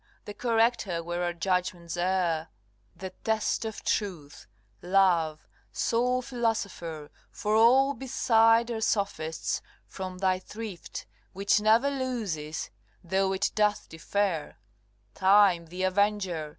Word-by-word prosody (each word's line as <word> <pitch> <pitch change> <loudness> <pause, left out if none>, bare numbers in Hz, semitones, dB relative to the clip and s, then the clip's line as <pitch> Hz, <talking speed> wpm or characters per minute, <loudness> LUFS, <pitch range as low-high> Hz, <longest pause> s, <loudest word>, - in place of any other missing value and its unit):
the 205 - -7
corrector 225 -6 +1
where 175 +1 -3
our 175 - 0
judgments 175 -1 -2
err, 175 -3 0 0.5
The 190 -1 -7
test 220 0 0
of 220 -1 -6
truth, 175 -9 -3 0.3
love, 175 -4 +2 0.2
sole 250 +2 0
philosopher, 200 - -3 0.2
For 210 +1 -1
all 260 +5 +5
beside 230 -2 +3
are 225 -1 -3
sophists, 195 -7 -1 0.2
from 185 -1 -7
thy 185 0 +1
thrift, 210 -1 -8 0.3
Which 200 +2 +2
never 225 +6 +4
loses 215 - -3 0.3
though 190 +2 +1
it 195 +1 0
doth 210 -1 +1
defer 170 0 -2 0.6
Time, 190 -3 +4
the 180 +3 -5
avenger! 185 -4 0
195 Hz, 110 wpm, -28 LUFS, 175-225 Hz, 0.6 s, all